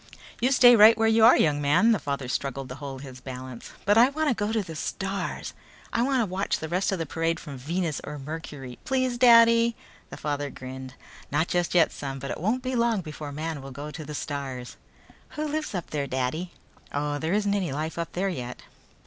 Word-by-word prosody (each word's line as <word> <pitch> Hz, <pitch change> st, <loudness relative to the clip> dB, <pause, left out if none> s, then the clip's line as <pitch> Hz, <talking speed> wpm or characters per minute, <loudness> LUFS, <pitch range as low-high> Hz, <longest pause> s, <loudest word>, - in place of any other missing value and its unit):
"You 250 Hz, +3 st, +2 dB
stay 245 Hz, -2 st, +8 dB
right 220 Hz, +1 st, +8 dB
where 225 Hz, 0 st, +3 dB
you 225 Hz, 0 st, +4 dB
are, 235 Hz, -, +8 dB
young 145 Hz, -2 st, +2 dB
man," 150 Hz, +11 st, +4 dB
the 215 Hz, -, +2 dB
father 140 Hz, -3 st, -3 dB
struggled 135 Hz, +1 st, -3 dB
to -, -, -5 dB
hold 135 Hz, -1 st, -6 dB
his 130 Hz, -2 st, -10 dB
balance. 130 Hz, -2 st, -8 dB
"But 205 Hz, +2 st, +5 dB
I 245 Hz, +3 st, +7 dB
wanna 300 Hz, -1 st, +1 dB
go 210 Hz, -1 st, -2 dB
to 220 Hz, -2 st, 0 dB
the 165 Hz, -3 st, -8 dB
stars. 195 Hz, +4 st, -4 dB, 0.4 s
I 235 Hz, -, +2 dB
can 255 Hz, -4 st, +1 dB
watch 190 Hz, +2 st, -1 dB
the 160 Hz, -, -5 dB
rest 180 Hz, +5 st, 0 dB
of 195 Hz, -, 0 dB
the 165 Hz, -, -2 dB
parade 165 Hz, +2 st, -1 dB
from 145 Hz, -4 st, -8 dB
Venus 160 Hz, +4 st, -2 dB
or 150 Hz, -, -6 dB
Mercury! 140 Hz, -3 st, -7 dB
Please, 255 Hz, -2 st, 0 dB
Daddy!" 230 Hz, -1 st, +6 dB, 0.3 s
The -, -, -8 dB
father 145 Hz, -1 st, -2 dB
grinned. 130 Hz, 0 st, -8 dB, 0.4 s
"Not 155 Hz, +4 st, +1 dB
just 175 Hz, 0 st, 0 dB
yet, 170 Hz, -, +5 dB
son, 135 Hz, -1 st, -5 dB
but 135 Hz, +1 st, -5 dB
it -, -, -5 dB
won't 230 Hz, +7 st, 0 dB
be 255 Hz, 0 st, -2 dB
long 235 Hz, -4 st, +2 dB
before 150 Hz, -3 st, -7 dB
man 155 Hz, 0 st, -4 dB
will 135 Hz, -, -8 dB
go 145 Hz, +3 st, -7 dB
to 155 Hz, -, -7 dB
the 150 Hz, 0 st, -7 dB
stars." 135 Hz, -4 st, -5 dB, 0.6 s
"Who 305 Hz, -, -1 dB
lives 305 Hz, -6 st, -3 dB
up 175 Hz, -, -5 dB
there, 145 Hz, -2 st, -2 dB
Daddy?" 130 Hz, +7 st, -2 dB, 0.4 s
"Oh, 145 Hz, 0 st, -2 dB
there 160 Hz, +4 st, -1 dB
isn't 205 Hz, -1 st, +1 dB
any 190 Hz, -7 st, -1 dB
life 155 Hz, +4 st, -3 dB
up 170 Hz, -1 st, -4 dB
there 195 Hz, +2 st, 0 dB
yet." 125 Hz, -8 st, -6 dB
165 Hz, 215 wpm, -26 LUFS, 140-220 Hz, 0.6 s, stay